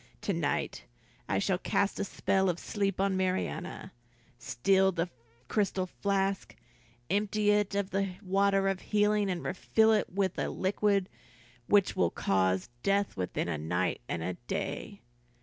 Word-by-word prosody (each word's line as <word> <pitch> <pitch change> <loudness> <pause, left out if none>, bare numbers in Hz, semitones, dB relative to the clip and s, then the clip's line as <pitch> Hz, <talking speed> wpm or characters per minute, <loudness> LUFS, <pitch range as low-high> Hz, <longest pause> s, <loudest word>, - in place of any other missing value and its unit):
"To - - -1
night - - -2 0.4
I 95 - +1
shall 180 - +1
cast 200 0 0
a - - +1
spell 190 -1 +1
of 175 - 0
sleep 195 0 -2
on 195 0 +2
Marianna, 185 0 -2 0.5
steal 190 +10 +2
the 170 0 -2 0.4
crystal 195 - 0
flask, 195 +1 -1 0.6
empty 210 +1 +2
it 205 -1 +1
of 200 -1 -1
the 195 -1 -1
water 195 +1 +2
of 195 -1 0
healing, 210 -1 +2
and 180 -2 -2
refill 220 +4 +3
it 215 - +1
with 190 -1 0
a - - 0
liquid 200 0 +1 0.6
which 205 -2 +4
will 85 - +3
cause 95 +1 +1
death 200 0 +1
within 90 -2 -2
a 80 -3 -2
night 90 +6 -1
and 85 -1 -2
a 90 +2 -2
day. 100 - -4
195 Hz, 150 wpm, -30 LUFS, 175-200 Hz, 0.6 s, which